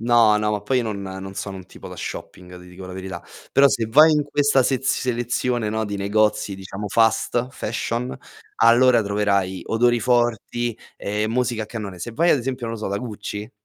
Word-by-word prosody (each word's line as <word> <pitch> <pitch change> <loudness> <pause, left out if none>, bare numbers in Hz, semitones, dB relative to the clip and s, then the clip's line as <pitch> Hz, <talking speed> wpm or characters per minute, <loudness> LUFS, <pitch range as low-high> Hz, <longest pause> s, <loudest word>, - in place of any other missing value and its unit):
No, 115 -2 +5
no, 105 0 0
ma 105 - -1
poi 125 +5 0
io - - +1
non 105 -3 -4
non 95 0 -7
sono 95 -1 -5
un 95 - -10
tipo - - -12
da - - -10
shopping, 90 0 -8
ti 90 - -14
dico 90 +1 -11
la 95 - -8
verità. 95 0 -7 0.3
Però 140 +1 +6
se 120 -4 0
vai 155 +8 +6
in 150 - +2
questa 145 -2 +2
sez 135 +1 0
selezione, 120 -2 0
no, 110 0 -1
di 100 0 -4
negozi, 105 0 +1
diciamo, 95 +2 -7
fast 115 +3 +2
fashion, 120 +2 -3 0.4
allora 120 +1 +5
troverai 100 -3 0
odori 120 +1 +2
forti 120 0 0 0.2
e 105 +1 -2
musica 120 -1 0
a - - -6
cannone. 105 -5 -6
Se 110 +7 -6
vai, 170 +9 +2
ad - - +5
esempio 125 -1 -4
non 115 - -3
lo 110 - -8
so, - - -2
da 100 +1 -2
Gucci, 105 -2 -6
110 Hz, 200 wpm, -22 LUFS, 100-120 Hz, 0.4 s, Però